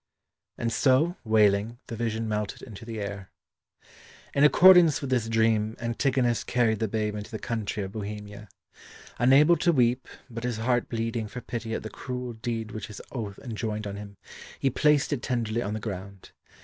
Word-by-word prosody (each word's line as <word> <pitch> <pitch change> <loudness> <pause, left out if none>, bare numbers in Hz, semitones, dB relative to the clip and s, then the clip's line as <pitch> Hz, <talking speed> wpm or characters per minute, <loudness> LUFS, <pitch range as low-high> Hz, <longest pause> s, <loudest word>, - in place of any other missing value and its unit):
And 115 -1 -1
so, 140 +8 +3
wailing, 110 0 +3
the 115 - -6
vision 115 0 -2
melted 105 -1 -3
into 110 -2 -10
the 115 -1 -5
air. 100 -2 -5 1.0
In 140 - +3
accordance 175 0 +7
with 140 -2 -5
this 120 -3 +1
dream, 110 -1 +2
Antigonus 120 0 0
carried 115 -3 +1
the 110 - 0
babe 105 0 -1
into 105 0 -6
the 110 - -5
country 110 -2 -3
of 95 - -6
Bohemia. 105 0 -7 0.7
Unable 140 +7 +6
to 170 +2 +3
weep, 125 -3 +2 0.2
but 115 -1 -7
his 120 -2 -2
heart 120 +2 0
bleeding 115 -1 -2
for 125 - -7
pity 115 -2 -4
at - - -4
the 110 - -5
cruel 125 -2 -5
deed 110 -1 -4
which 110 - -6
his 105 - -9
oath 105 -6 -5
enjoined 110 -3 -4
on 100 -1 -5
him, 100 -1 -9 0.4
he 135 - +1
placed 150 +2 +3
it 135 - -2
tenderly 120 -3 -1
on 105 -1 -3
the - - -3
ground. 100 -2 -7
115 Hz, 175 wpm, -27 LUFS, 105-125 Hz, 1.0 s, accordance